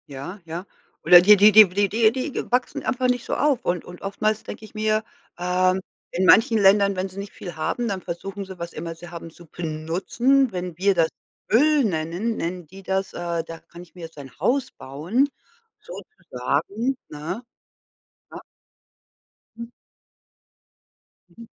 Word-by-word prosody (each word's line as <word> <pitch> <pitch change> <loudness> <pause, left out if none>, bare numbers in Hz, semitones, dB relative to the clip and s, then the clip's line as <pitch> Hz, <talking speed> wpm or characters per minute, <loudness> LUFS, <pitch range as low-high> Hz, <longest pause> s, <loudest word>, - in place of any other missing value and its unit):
Ja, 145 +9 -8
ja. 170 +3 -6 0.4
Oder 175 +2 +9
die 210 +4 +8
die 205 +2 +7
die 210 -1 +8
w - - -15
die 200 0 +2 0.2
die 260 +4 -3
die - - -5
wachsen 250 0 0
einfach 255 0 0
nicht 245 -1 0
so - - -2
auf. 285 -4 +1
Und 175 -1 -1
und 180 0 -12
oftmals 215 +2 -1
denke 215 - -9
ich - - -16
mir, 215 0 0 0.3
ähm, 185 +1 +1 0.3
in 185 +2 0
manchen 225 +3 +6
Ländern, 200 0 +4
wenn 185 +1 -2
sie 185 - -13
nicht 200 0 -7
viel 175 -4 -8
haben, 235 +9 -2
dann 195 -3 -3
versuchen 195 +4 -6
sie, 190 -2 -11
was 170 0 -6
immer 165 +1 -6
sie 170 +1 -12
haben, 170 -1 -8
zu 170 +1 -15
benutzen. 175 - 0
Wenn 180 -3 -5
wir 195 +2 +3
das 165 -3 +3 0.4
Öl 295 +5 +4
nennen, 175 +5 -2
nennen 175 0 -4
die 195 +4 -13
das, 190 0 -2
äh, 170 -1 -3
da 165 0 -9
kann 170 - -14
ich 175 0 -16
mir 180 - -11
jetzt 165 -1 -10
ein 135 -4 -11
Haus 245 - 0
bauen 175 - -1 0.5
sozusagen, 210 - -3
ne, 155 +11 -6 0.9
ja. - - -9 1.2
Mhm. 235 0 -8 1.6
Mhm. 230 +7 -14
190 Hz, 170 wpm, -23 LUFS, 170-220 Hz, 1.6 s, Oder